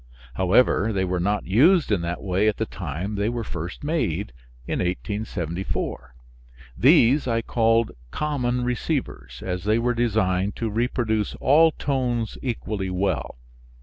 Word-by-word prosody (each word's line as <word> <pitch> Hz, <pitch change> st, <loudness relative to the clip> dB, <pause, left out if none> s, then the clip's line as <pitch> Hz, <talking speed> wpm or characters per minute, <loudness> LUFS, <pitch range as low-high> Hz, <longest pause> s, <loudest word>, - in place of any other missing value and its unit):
However, 100 Hz, -, +3 dB
they 95 Hz, -3 st, 0 dB
were 90 Hz, 0 st, -1 dB
not 100 Hz, +4 st, 0 dB
used 145 Hz, -, +4 dB
in 100 Hz, -4 st, +2 dB
that 85 Hz, +1 st, -4 dB
way 100 Hz, +2 st, +1 dB
at 105 Hz, -, +1 dB
the 110 Hz, -, -1 dB
time 90 Hz, +1 st, -5 dB
they 105 Hz, +1 st, 0 dB
were 120 Hz, -1 st, -3 dB
first 85 Hz, -, -6 dB
made 110 Hz, -, -1 dB, 0.3 s
in -, -, -2 dB
1874. 90 Hz, -, -3 dB, 0.6 s
These 135 Hz, -, +5 dB
I 115 Hz, -1 st, 0 dB
called 115 Hz, -1 st, +2 dB, 0.2 s
common 125 Hz, -, -1 dB
receivers, 120 Hz, -, -3 dB
as 90 Hz, -1 st, -3 dB
they 110 Hz, +2 st, +2 dB
were 120 Hz, +1 st, +1 dB
designed 105 Hz, -5 st, 0 dB
to 115 Hz, -2 st, -3 dB
reproduce 110 Hz, -2 st, -1 dB
all 160 Hz, +4 st, +5 dB
tones 125 Hz, -6 st, -2 dB
equally 110 Hz, -6 st, -3 dB
well. 95 Hz, -7 st, -2 dB
110 Hz, 140 wpm, -24 LUFS, 95-120 Hz, 0.6 s, These